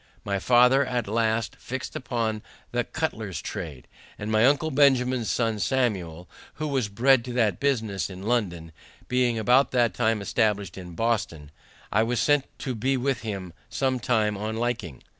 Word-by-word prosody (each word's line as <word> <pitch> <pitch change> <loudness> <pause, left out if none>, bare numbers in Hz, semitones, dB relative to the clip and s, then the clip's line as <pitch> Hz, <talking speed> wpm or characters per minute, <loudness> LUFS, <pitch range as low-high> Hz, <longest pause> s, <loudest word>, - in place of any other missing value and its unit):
My 100 -1 -1
father 125 +5 +5
at 125 -4 -2
last 110 +1 0
fixed 130 +1 -6
upon 115 -4 -2 0.3
the - - 0
cutler's - - -3
trade, 70 -6 -6 0.3
and 105 +1 -4
my 110 +3 +5
uncle 145 +3 +2
Benjamin's 130 -4 +3
son 115 -3 0
Samuel, 95 -8 -1 0.3
who 155 +1 -3
was 130 -6 0
bred 125 +4 +4
to 125 - -5
that 110 -7 +1
business 110 -9 0
in 95 0 -9
London, 95 -8 -1 0.4
being 125 -2 +1
about 125 +5 +4
that 120 -5 +3
time 115 +1 +1
established 100 -3 0
in 90 -3 -9
Boston, 100 -10 -1 0.4
I 110 - +3
was 120 +2 0
sent 145 -2 +3 0.2
to 130 - -2
be 130 +4 0
with 130 -1 -1
him 95 -6 -5 0.2
some 130 -2 0
time 110 -4 +1
on 110 +2 -4
liking. 115 - -3
115 Hz, 160 wpm, -26 LUFS, 100-125 Hz, 0.4 s, father